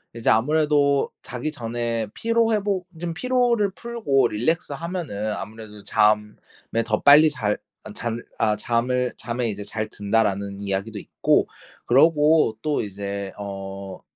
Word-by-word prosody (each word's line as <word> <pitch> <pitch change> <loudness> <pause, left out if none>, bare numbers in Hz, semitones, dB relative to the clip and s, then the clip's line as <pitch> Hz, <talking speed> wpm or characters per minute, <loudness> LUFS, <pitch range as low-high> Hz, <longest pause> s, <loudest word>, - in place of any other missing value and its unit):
이제 115 - 0
아무래도 145 +2 +3
자기 125 +5 -4
전에 115 -3 -3
피로 230 0 +1
회복 200 -3 -1
좀 170 0 -3
피로를 240 -1 +1
풀고 195 - 0
relax 145 +11 -1
하면은 150 - -3
아무래도 105 0 -8
잠에 105 +2 0
더 110 -1 0
빨리 150 +2 +8
잘 110 -8 -1 0.3
아 - - -9
잘 115 0 -4 0.2
아 105 -1 +2
잠을 125 +3 0
'잠에 120 +1 -2
이제 105 -1 -5
잘 110 +1 -4
든다.'라는 100 -1 -1
이야기도 100 +2 -3
있고 - - +1 0.4
그러고 150 -2 +4
또 150 +2 0
이제 100 -1 -5
어 95 -1 -7
115 Hz, 275 characters per minute, -23 LUFS, 105-155 Hz, 0.4 s, 빨리